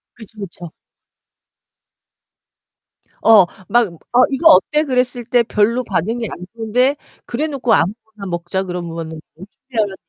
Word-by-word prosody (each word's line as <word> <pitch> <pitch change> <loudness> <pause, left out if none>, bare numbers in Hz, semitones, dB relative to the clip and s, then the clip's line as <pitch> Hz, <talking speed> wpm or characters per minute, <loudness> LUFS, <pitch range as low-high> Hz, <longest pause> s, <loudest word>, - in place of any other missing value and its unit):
그쵸, 220 -1 -14
그쵸. 175 -3 -8 2.5
어 215 -4 +7 0.2
막 240 -1 +3 0.3
"어 250 +1 +6
이거 320 +4 +5
어때?" 300 0 +3
그랬을 250 -3 -1
때 240 +1 +3
별로 230 +3 +1
반응이 225 +3 -2
안 180 - -8
좋은데 245 +5 +1 0.3
그래 280 +6 -2
놓고 265 -6 0
"아무거나 215 +3 -1
먹자." 175 +2 -3
그러면은 165 -3 -6 0.2
어떻게 230 +7 -13
하면 205 -3 0
225 Hz, 255 characters per minute, -18 LUFS, 190-250 Hz, 2.5 s, 어